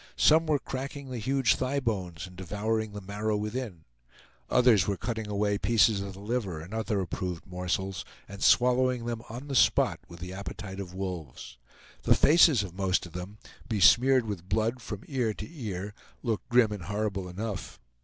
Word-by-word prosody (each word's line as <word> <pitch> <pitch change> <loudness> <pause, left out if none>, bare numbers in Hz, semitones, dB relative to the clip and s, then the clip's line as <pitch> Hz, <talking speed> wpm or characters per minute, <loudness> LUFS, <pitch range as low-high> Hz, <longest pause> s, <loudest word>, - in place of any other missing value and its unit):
Some 160 +1 +5
were 150 -2 +3
cracking 135 0 -6
the 125 - -4
huge 130 -1 +2
thigh 135 +2 -1
bones 95 - -3
and 90 -1 -13
devouring 105 +4 -2
the 105 - -6
marrow 105 +2 -2
within; 105 -5 -4 0.7
others 120 -7 +5
were 100 -1 0
cutting 110 -1 -3
away 100 0 0
pieces 110 -3 +3
of 100 -1 -6
the 95 - -11
liver 105 -6 -2
and 85 +6 -10
other 110 -2 -1
approved 90 -1 -4
morsels, 90 +1 -3 0.2
and 100 0 -10
swallowing 125 -1 +4
them 120 -1 -3
on 125 +6 -7
the 140 - -4
spot 130 - +4
with 85 0 -12
the 90 +1 -6
appetite 100 0 -7
of 90 -2 -7
wolves. 80 -10 -6 0.4
The - - +4
faces 155 -7 +6
of 95 -3 -7
most 95 -1 0
of 85 - -11
them, 90 +4 -7 0.3
besmeared 120 +5 +5
with 95 -4 -6
blood 115 +3 0
from 105 -4 -6
ear 120 -6 -1
to - - -7
ear, 105 - -5 0.3
looked 115 -4 -2
grim 120 -3 +4
and 100 -5 -5
horrible 100 -1 -2
enough. 100 +1 -5
105 Hz, 175 wpm, -29 LUFS, 95-120 Hz, 0.7 s, faces